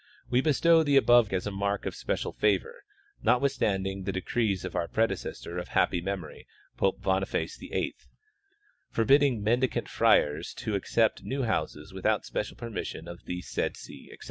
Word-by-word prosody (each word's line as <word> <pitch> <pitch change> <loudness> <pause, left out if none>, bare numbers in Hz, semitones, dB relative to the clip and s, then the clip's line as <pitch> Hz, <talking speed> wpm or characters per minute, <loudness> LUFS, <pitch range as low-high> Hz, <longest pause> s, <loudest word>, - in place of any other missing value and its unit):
We 125 +1 +4
bestow 160 +3 +4
the 145 -3 +3
above 120 -4 +5
as 95 -1 -1
a 105 - -2
mark 100 +1 -2
of - - -2
special - - -3
favor, 475 -1 0 0.4
notwithstanding 100 -7 +1
the 95 +1 -2
decrees 95 0 -1
of 95 - -6
our 85 - 0
predecessor 110 -5 -2
of 90 - -6
happy 85 - +1
memory, 90 -4 -5 0.3
Pope 95 - 0
Boniface 95 0 0
VIII, - - -3 1.0
forbidding 135 -1 +3
mendicant 120 +4 +1
friars 75 +3 +2
to 110 - -4
ac 100 - -2
cept 115 -1 +2
new 135 0 -2
houses 110 -2 -2
without - - 0
special - - -4
permission 115 -7 -5
of 85 0 -10
the 90 0 -4
said - - -2
see, - - -11
etc. - - -12
105 Hz, 160 wpm, -28 LUFS, 95-125 Hz, 1.0 s, above